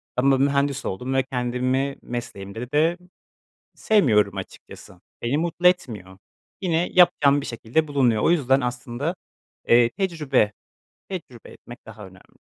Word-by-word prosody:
ama 135 +2 +3
mühendis 140 0 0
oldum 125 +8 -3
ve 135 0 +2
kendimi 130 +2 -1
mesleğimde 115 0 -7
de 160 +4 +2 0.8
sevmiyorum 105 - +2
açıkçası, 95 - -10 0.2
beni 120 +5 0
mutlu 170 +2 +1
etmiyor. 105 - -1 0.4
Yine 175 -2 0
yapacağım 150 -6 +4
bir - - -7
şekilde 120 +7 -1
bulunuyor, 125 -7 +1
o - - +4
yüzden 135 -5 +2
aslında, 125 +6 -3 0.5
eee, 120 0 +5
tecrübe, 155 - 0 0.6
tecrübe 155 - -8
etmek 120 0 -14
daha 110 -2 -11
önemli. 95 0 -20
130 Hz, 125 wpm, -23 LUFS, 120-155 Hz, 0.8 s, eee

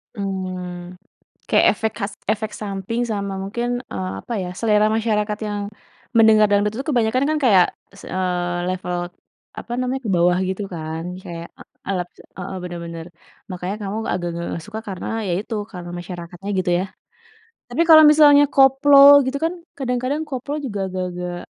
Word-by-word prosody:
Mmm, 185 -3 -5 0.6
kayak - - +4
efek 220 +1 -1
khas, 200 0 -2 0.2
efek 215 0 -3
samping 205 +3 -3
sama 200 -2 -2
mungkin, 235 +5 -3 0.2
eee, 95 -1 -3
apa - - -6
ya, 180 - -4
selera 215 -2 +3
masyarakat 210 -1 0
yang 205 0 -3 0.6
mendengar 220 -1 +6
dangdut 205 +1 +2
itu 265 +5 -5
kebanyakan 250 +1 +2
kan 310 0 +1
kayak, 190 -7 +6 0.3
s 200 - -15
eee, 175 -1 -1
level 180 -1 -3 0.6
apa 240 - -8
namanya 255 +1 -2
ke 205 - -1
bawah 175 +1 +3
gitu 190 +2 -3
kan. 160 0 -5 0.2
Kayak 170 -1 -7
e - - -8 0.3
alat 180 -2 -2 0.3
heeh, 190 +1 -5
bener 175 -1 -6
bener, 165 -1 -7 0.4
makanya 180 +2 -4
kamu 200 +1 -4 0.2
agak-agak 175 -1 -2 0.2
enggak 165 - -5
suka 215 +1 -6
karena 190 -2 -6 0.2
ya - - 0
itu, 225 +2 -6 0.2
karena 175 -2 -8
masyarakatnya 175 +1 -8
gitu 180 -1 0
ya. 185 - -1 0.8
Tapi 335 - +1
kalau 315 -1 +10
misalnya 290 -1 +7
koplo 270 +1 +5 0.3
gitu 260 +2 -1
kan, 330 - +1 0.3
kadang-kadang 255 +3 -1
koplo 275 +1 -4
juga 210 -6 -4
agak-agak 180 -1 -4
200 Hz, 160 wpm, -21 LUFS, 180-230 Hz, 0.8 s, kalau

